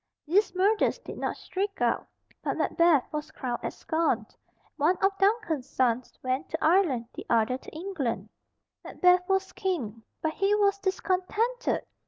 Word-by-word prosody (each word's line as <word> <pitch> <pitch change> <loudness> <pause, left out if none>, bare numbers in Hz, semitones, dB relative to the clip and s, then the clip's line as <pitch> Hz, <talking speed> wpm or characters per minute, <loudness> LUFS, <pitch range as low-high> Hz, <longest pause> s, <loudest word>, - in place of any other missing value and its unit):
These 370 +4 +2
murders 405 +4 +3
did - - -9
not - - -2
shriek 395 +2 -3
out, - - +1 0.4
and - - -1
Macbeth 335 -6 +3
was 300 0 -3
crowned 250 -5 -4
at - - -3
Scone. 315 -9 0 0.5
One 325 +5 +3
of 390 0 +2
Duncan's 390 - +1
sons 250 -3 0
went 255 +1 -1
to 320 - -2
Ireland, 315 -8 +3
the - - -9
other 235 +2 +2
to - - -11
England. 320 -8 -3 0.5
Macbeth 360 0 +3
was 385 0 +1
King. 260 - -2 0.2
But 315 0 0
he 395 +3 +2
was 400 -1 +2
discontented. 395 +6 0
350 Hz, 150 wpm, -28 LUFS, 265-390 Hz, 0.5 s, murders